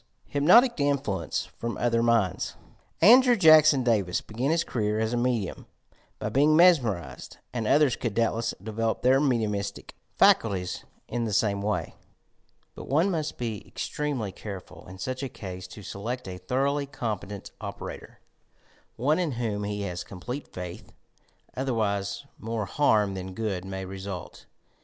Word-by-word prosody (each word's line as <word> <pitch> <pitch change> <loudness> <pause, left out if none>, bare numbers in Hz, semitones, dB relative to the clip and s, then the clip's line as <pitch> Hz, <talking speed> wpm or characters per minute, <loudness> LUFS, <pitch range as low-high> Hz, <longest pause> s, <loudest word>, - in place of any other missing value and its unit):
HYPNOTIC 200 - +5
INFLUENCE 140 - -1
PEOM 115 0 -3
OTHBB 115 -1 +1
MINDS 115 -6 +1 0.5
Andrew 250 +2 +8
Jackson 155 -6 +7
Davis 100 -7 +1
began 120 +6 -3
his 165 +1 +2
career 105 -2 -1
as 110 +1 0
a - - +1
medium 120 -5 -1 0.5
by - - -4
being 150 +3 +4
mesmerized, 120 - +2 0.2
and 115 -3 -2
others 145 -2 +4
could 115 -5 -3
doubtless 115 0 0
develop 110 +1 -2
their 130 +2 +5
mediumiatic 105 -7 -1 0.3
faculties 95 -5 +3 0.2
in 120 -1 -2
the 110 - -2
same 100 -1 +1
way; 105 +1 -2 0.8
but - - -10
one 165 +8 +2
must 155 -3 -2
be 115 -4 -4
extremely 140 -9 -3
careful 95 -1 -9
in 95 +1 -10
such 130 +7 -4
a 105 -8 -6
ease 90 0 -9
to 105 +3 -11
select 115 +5 -5
a 90 -1 -6
thoroughly 140 +8 0
competent 105 -7 -5
operator, - - -8 0.4
— - - -34 0.3
one 150 +8 +1
in 170 -6 0
whom 110 -4 -2
he 105 0 -3
has 90 -3 -4
complete 125 +10 -7
faith, 90 -1 -8 0.6
otherwise 110 -4 -1
more 110 -2 -3
barm 105 -8 +4
than 95 0 -6
good 100 -5 -2
may 95 0 -5
result. 95 -1 -7
115 Hz, 145 wpm, -27 LUFS, 100-135 Hz, 0.8 s, Andrew